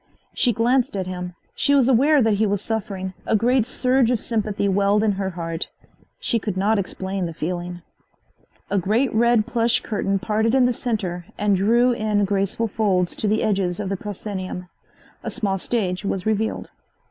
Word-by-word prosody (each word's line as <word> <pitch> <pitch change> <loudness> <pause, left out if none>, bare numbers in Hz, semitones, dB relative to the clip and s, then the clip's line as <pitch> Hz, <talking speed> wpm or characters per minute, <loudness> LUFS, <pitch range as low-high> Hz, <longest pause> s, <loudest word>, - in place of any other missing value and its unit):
She 245 - +2
glanced 240 +2 +1
at 190 - -2
him. 180 -1 -5 0.2
She 285 +1 +2
was 265 -3 +4
aware 270 +3 +4
that 220 -1 +3
he 215 +1 +2
was 205 0 0
suffering. 195 -3 -4
A - - +3
great 240 +2 +2
surge 255 -1 +2
of 245 -3 +1
sympathy 210 -3 -1
welled 200 +2 +2
in 215 - +3
her 195 -1 -2
heart. 165 -2 -4 0.5
She 230 - 0
could 205 -3 -4
not 205 +2 +2
explain 190 -1 -3
the 165 - -7
feeling. 175 +1 -4 0.9
A 200 - +2
great 220 +9 +1
red 235 -1 +3
plush 235 0 +2
curtain 195 -2 -1
parted 220 +4 +1
in 260 -2 +5
the 250 - +2
center 190 -8 -3
and 205 -1 +2
drew 235 +6 +3
in 215 -3 +1
graceful 200 +3 0
folds 195 -4 0
to 215 - -1
the 215 +1 +1
edges 190 -4 0
of 200 -2 -3
the 195 - -1
proscenium. 190 -2 -6 0.5
A - - -3
small 195 -2 -1
stage 190 -4 -1
was 195 -2 -2
revealed. 220 0 -1
205 Hz, 180 wpm, -22 LUFS, 190-230 Hz, 0.9 s, in